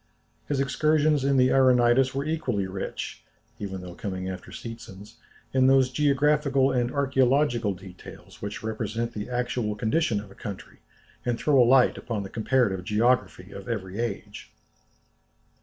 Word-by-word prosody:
His 145 -2 -1
excursions 150 +1 +2
in 140 0 +2
the 125 0 +4
Auranitis 130 0 +4
were 140 +1 -1
equally 130 -11 -1
rich, 95 +1 -6 0.4
even 95 -2 -5
though 90 -1 -9
coming 95 0 -5
after 95 -1 -7
Seetzen's, 115 -2 -10 0.4
in 130 0 +4
those 130 -1 +4
geographical 140 0 +2
and 120 -2 +1
archæological 130 -5 +1
details 90 -1 -13
which 100 +1 -6
represent 110 +1 -3
the 105 +2 -5
actual 120 -3 -2
condition 110 +1 0
of 100 -1 -10
a - - -12
country, 100 -1 -9 0.4
and 120 -1 -1
throw 140 -1 +3
a 120 - +4
light 130 -1 +4
upon 110 -4 -4
the 95 - -7
comparative 110 -5 +1
geography 105 -3 0
of 100 +2 -9
every 100 -3 -4
age. 115 -4 -5
120 Hz, 145 wpm, -26 LUFS, 100-135 Hz, 0.4 s, the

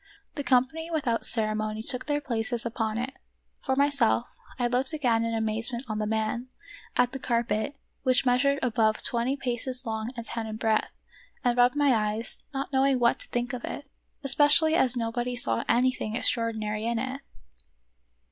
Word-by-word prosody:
The 285 - -4
company 270 +6 +1
without 240 -9 +1
ceremony 215 -1 +3
took 250 +3 +2
their 290 0 0
places 235 -2 -2
upon 225 -2 -2
it: 255 +3 -3 0.5
for 265 - 0
myself, 280 -4 +1 0.2
I 245 - 0
looked 255 +4 0
again 240 -7 +1
in 230 0 -1
amaze 220 +2 -1
ment 240 +2 -5
on 215 -1 -3
the 215 - -1
man; 220 +3 -2 0.5
at 245 0 +3
the 270 - -6
carpet, 235 +1 -1 0.3
which 255 0 +2
measured 270 +3 +3
above 220 -3 +1
twenty 240 +3 +1
paces 255 -1 -1
long 220 +1 -3
and 235 - -5
ten 230 -1 -3
in 215 - -5
breadth; 220 -1 0 0.5
and 245 -2 +2
rubbed 245 +1 +4
my 290 -2 +3
eyes, 215 0 -2
not 275 0 -4
knowing 270 0 +3
what 240 -1 +2
to - - -6
think 245 +1 -3
of 245 - -5
it, 290 - -6 0.4
especially 295 +3 +5
as 260 -6 +3
nobody 240 +1 -2
saw 115 - 0
anything 240 -2 +1
extraor 230 -1 0
dinary 215 -1 -4
in 235 - -1
it. 260 +3 -4
245 Hz, 175 wpm, -27 LUFS, 225-265 Hz, 0.5 s, especially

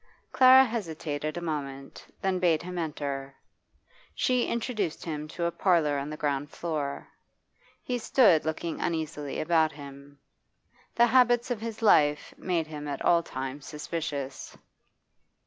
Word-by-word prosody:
Clara 260 +1 +8
hesitated 160 - -4
a - - -4
moment, 140 -4 -5 0.2
then 190 -1 +1
bade 170 -3 +2
him 180 0 -5
enter. 140 -4 -4 0.8
She 250 -1 +1
introduced 220 -8 -2
him 155 -2 -4
to 170 +2 -4
a 170 - 0
parlour 165 -6 +2
on 140 +1 -5
the 155 - -6
ground 145 -1 -1
floor. 150 -5 -4 0.8
He 245 -1 -2
stood 220 - +4
looking 160 +1 -3
uneasily 155 -3 -3
about 160 -1 +2
him. 140 0 -12 0.8
The 240 - +6
habits 245 0 +3
of 230 -3 -2
his 225 0 -6
life 150 -8 +4
made 175 -3 -1
him 150 -1 -7
at 140 -1 -4
all 170 -1 +5
times 135 -2 -6
suspicious. 150 -3 -5
160 Hz, 135 wpm, -28 LUFS, 145-185 Hz, 0.8 s, Clara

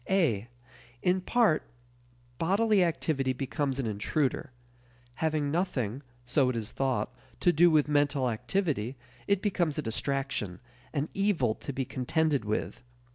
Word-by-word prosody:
(a) 140 - +2 0.6
In 185 +1 +2
part 215 -5 +3 0.8
bodily 200 +3 +3
activity 150 -5 0
becomes 135 +1 -2
an 135 - -1
intruder. 130 +7 -1 0.7
Having 155 -3 +1
nothing, 135 - -1 0.2
so 130 +1 +3
it 125 - -1
is 110 -1 -3
thought, 130 -2 -1 0.3
to 175 - +4
do 175 +3 +6
with 155 -3 +4
mental 145 -2 +2
activity, 125 - -1 0.3
it 200 -1 +2
becomes 180 -7 +1
a - - +1
distraction, 125 -5 -2 0.3
an 145 0 -1
evil 190 - +2
to 140 - -6
be 135 -1 -2
contended 140 +1 0
with. 105 +3 -2
145 Hz, 130 wpm, -29 LUFS, 125-170 Hz, 0.8 s, do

